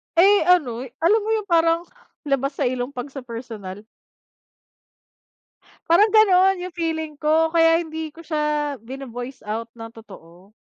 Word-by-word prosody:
Eh, 385 +1 +5
ano, 265 -9 +2 0.2
alam 385 +7 +4
mo - - -3
yung 425 -3 -3
parang 330 0 +3 0.4
labas 275 -1 -1
sa 275 -3 0
ilong 250 +2 -4
pag 250 +2 -6
sa 270 -2 -9
personal. 225 -5 -8 2.1
Parang 360 +6 +6
ganun 385 -3 +4
yung 365 - -6
feeling 320 -3 -3
ko, 320 +1 +2
kaya 330 0 +4
hindi 320 0 -6
ko 330 - -12
siya 300 -2 -1
bino-voice 250 +1 -8
out 220 +2 -4
ng 225 -1 -9
totoo, 195 -3 -16
300 Hz, 140 wpm, -22 LUFS, 245-335 Hz, 2.1 s, Parang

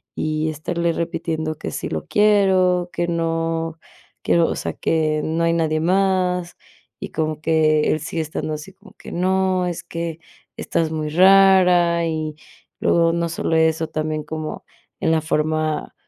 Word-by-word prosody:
y 155 0 -1
estarle 170 +2 -2
repitiendo 160 -2 -3
que - - -6
sí - - -4
lo - - -4
quiero, 190 -4 +3
que 175 0 -1
no 165 -1 -2 0.4
quiero 170 -1 +3
o - - -2
sea, - - -4
que 155 -1 0
no 165 +1 -1
hay 165 - +2
nadie 155 -2 0
más, 180 -1 +1 0.4
y - - -7
como 155 -1 -2
que 155 -1 +2
él 155 - 0
sigue 160 +1 -3
estando 155 0 -4
así 150 +5 -7
como 200 +2 -19
que: - - -11
"No, 185 0 +1
es 170 -1 -4
que 165 -1 -5 0.4
estás 160 -1 -1
muy 155 -1 -3
rara", 180 -1 +5
y 155 -1 -3 0.4
luego 165 -1 +3
no 170 0 0
solo 165 0 -1
eso, 160 0 +2
también 155 -1 -3
como 155 -1 -6 0.4
en - - +2
la 160 - +3
forma, 155 -1 -1
165 Hz, 155 wpm, -21 LUFS, 155-180 Hz, 0.4 s, rara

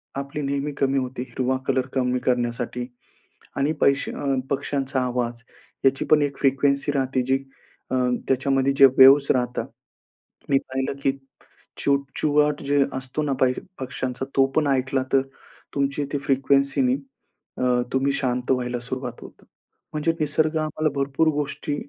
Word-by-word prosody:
आपली 140 +2 -4
नेहमी 140 +1 -2
कमी 135 0 +1
होते. 125 -1 -4
हिरवा 130 +1 -1
कलर 130 0 +1
कमी 125 -1 +1
करण्यासाठी 120 0 -1 0.7
आणि 145 +3 +1
पैशे 140 0 +2
अ, - - -6 0.3
पक्ष्यांचा 140 -1 -1
आवाज. 120 -2 -2 0.4
याची 135 0 +3
पण 150 -1 +6
एक 140 -1 -3
फ्रिक्वेन्सी 140 +1 +2
राहते 130 -1 0
जी, 130 +1 +2 0.5
अ, 130 - +1 0.3
त्याच्यामध्ये 135 +1 +2
जे 135 - +9
वेव्हज 135 +2 +8
राहतात. 125 -1 -1 0.8
मी 135 - +4
पाहिलं 130 +1 -2
की 135 - +3 0.7
चिवचिवाट 145 +1 +1
जे 140 0 +3
असतो 130 +3 -3
ना 145 -2 -1
पाहिज 130 -1 +2 0.2
पक्ष्यांचा 130 0 -4
तो 135 -1 +5
पण 155 - +3
ऐकला 135 0 +1
तर 135 - +5 0.5
तुमची 140 +1 0
ती 145 - 0
फ्रिक्वेन्सीनी 140 - +2 0.7
अ, 125 -1 +2
तुम्ही 135 +1 +1
शांत 125 -2 -1
व्हायला 125 -1 -1
सुरुवात 125 0 -6
होते. - - -13 0.5
म्हणजे 155 +2 0
निसर्ग 155 +1 +1
आम्हाला 155 0 -1
भरपूर 140 +3 +1
गोष्टी 145 0 -3
135 Hz, 140 wpm, -24 LUFS, 130-140 Hz, 0.8 s, जे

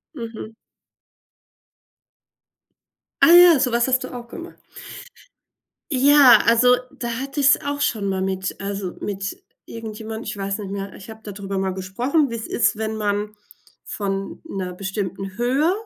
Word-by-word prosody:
Mhm. 225 -3 -8 2.7
Ah 330 - +7
ja, 350 -4 +8
so 250 -1 +1
was 235 +1 +2
hast 255 -1 +1
du - - -7
auch 240 -1 -8
gemacht? 340 +8 -10 1.3
Ja, 275 -1 +7
also, 245 +2 +5
da 235 -1 -5
hatte 275 +2 -5
ich's 270 -1 +6
auch 285 0 -3
schon 215 -8 0
mal 190 -1 -2
mit 190 0 -3
also, 195 -2 -4
mit 195 -1 -5 0.2
irgendjemandem, 220 0 -7
ich - - -5
weiß 195 0 -3
nicht 200 -2 -6
mehr 200 0 -5
ich 190 - -12
habe 220 0 -13
da 210 - -7
drüber 195 0 -5
mal 190 -1 -1
gesprochen, 245 - 0
wie's 230 -1 -5
ist, 235 - +1
wenn 220 0 -3
man 210 0 -2 0.5
von 195 -1 -4
'ner 185 - -5
bestimmten 195 0 -5
Höhe 265 +8 +2
220 Hz, 150 wpm, -22 LUFS, 195-250 Hz, 2.7 s, ja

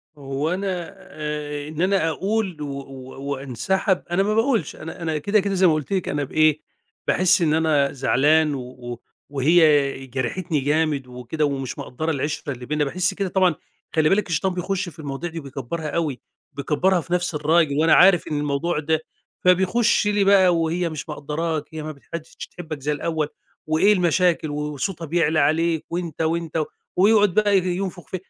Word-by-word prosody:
وأنا 170 +7 -3
آآ، 150 -2 -5
إن 155 +2 -5
أنا 185 -3 +2
أقُول 195 -2 -2
و 145 - -4
و 135 +1 -8
وانسحب، 180 - -1
أنا 190 +3 +2
ما 210 +1 0
باقولش، 225 - +1
أنا 160 +3 -9
أنا 160 -2 -1
كده 205 +8 +2
كده 200 0 -1
زي 185 -1 +4
ما 160 - +4
قُلت 155 +4 -3
لِك، 185 - -1
أنا 145 -1 -1
بإيه، 155 +2 +2 0.5
باحس 185 0 +3
إن 155 -2 +2
أنا 155 -3 +2
زعلان 145 +3 +3
و 130 - -4
و 120 -1 -8 0.3
وهي 145 -2 +3
جرحتني 145 +6 -2
جامد 145 -1 0
وكده 125 +5 -3
ومش 135 -3 -3
مقدّرة 160 +6 -3
العِشّرة 145 0 -3
اللي 125 0 -9
بيننا، 150 +1 0
باحس 185 +6 0
كده 195 -1 -2
طبعًا 185 -4 +3 0.4
خلي 155 -1 +4
بالِك 195 -2 +1
الشيطان 180 +4 0
بيخش 185 +1 -2
في 165 - -17
المواضيع 145 +3 -4
دي 165 0 -6
و - - -8
بيكبرها 140 +4 -5
أوي 150 -8 -2 0.3
بيكبرها 160 +6 +1
في 175 - -5
نِفس 175 -2 0
الراجل، 150 -1 +2
وأنا 160 +1 +4
عارف 180 -1 +6
إن 150 - -2
الموضوع 150 +3 -1
ده، 160 0 0 0.5
فبيخش 190 +5 +3
لي 205 -1 +2
بقى 190 -3 +5
وهي 165 +1 0
مش 155 +1 -7
مقدّراك 150 +1 -2
هي 155 -1 -5
متح 155 -3 -8
ما 170 - -1
بقتش 155 - -21
تحبك 160 -4 -7
زي 145 +3 -1
الأول 155 0 -1 0.4
وإيه 180 +7 +4
المشاكل 175 -3 +2
و - - -4 0.2
وصوتها 165 +3 -3
بيعلى 160 -1 +1
عليك 160 +2 +1
وأنت 170 -2 -4
وأنت 160 -1 0 0.3
ويقعد 205 0 +4
بقى 205 -2 +4
ينفخ 185 0 -2
ف - - -4
160 Hz, 175 wpm, -23 LUFS, 145-180 Hz, 0.5 s, عارف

